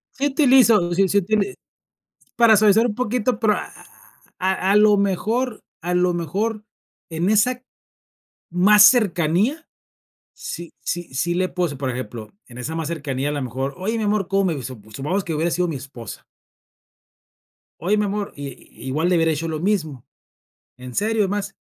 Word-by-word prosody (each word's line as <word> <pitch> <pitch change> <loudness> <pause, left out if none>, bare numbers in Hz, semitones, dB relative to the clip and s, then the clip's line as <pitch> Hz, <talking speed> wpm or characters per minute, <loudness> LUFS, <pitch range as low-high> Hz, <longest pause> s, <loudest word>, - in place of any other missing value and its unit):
Sí 280 +2 0
utilizo, 255 - +4
sí, 195 +2 +3
sí, 200 - +3
utili 200 0 -1 0.8
para 230 -2 +6
suavizar 215 +2 +4
un 210 - -4
poquito, 245 -1 -1
pero, 215 -2 +3
a - - -6 0.7
a 190 +1 0
a - - +4
lo 210 0 +5
mejor 215 +5 -1 0.2
a 175 +2 -2
lo 180 0 +2
mejor, 205 +7 -2 0.5
en 165 +3 -1
esa 245 +4 +2 0.9
más 200 +4 +6
cercanía, 215 - +3 0.7
sí 170 -1 -8
sí 175 -5 -4
sí 155 +6 0
le 185 +1 0
puse, 175 -6 -2
por 130 -1 -3
ejemplo, 115 -3 -7
en 120 -1 -13
esa 140 +6 -5
más 165 -2 -3
cercanía, 140 -4 -3
a - - -2
lo 145 -2 -3
mejor: 130 +3 -4
"Oye, 215 +5 -2
mi 220 - -2
amor, 205 -3 0
¿cómo 195 0 +1
me 170 - 0
visto?". 130 -2 -6
Su 110 - -18
supongamos 150 - -2
que 165 - -3
hubiera 160 +3 0
sido 180 +1 0
mi 155 - -3
esposa 130 -5 -10 1.6
"Oye, 200 +4 +2
mi 210 - +1
amor", 205 0 -3
i 140 -1 -9 0.2
igual 155 +7 0
le 180 - +3
hubiera 165 -1 +2
dicho 160 +2 -3
lo 155 -1 -3
mismo. 160 - -2 0.7
En 125 0 -10
serio, 215 - +1
es 195 - -1
más, 200 -1 -3
185 Hz, 175 wpm, -21 LUFS, 155-210 Hz, 1.6 s, para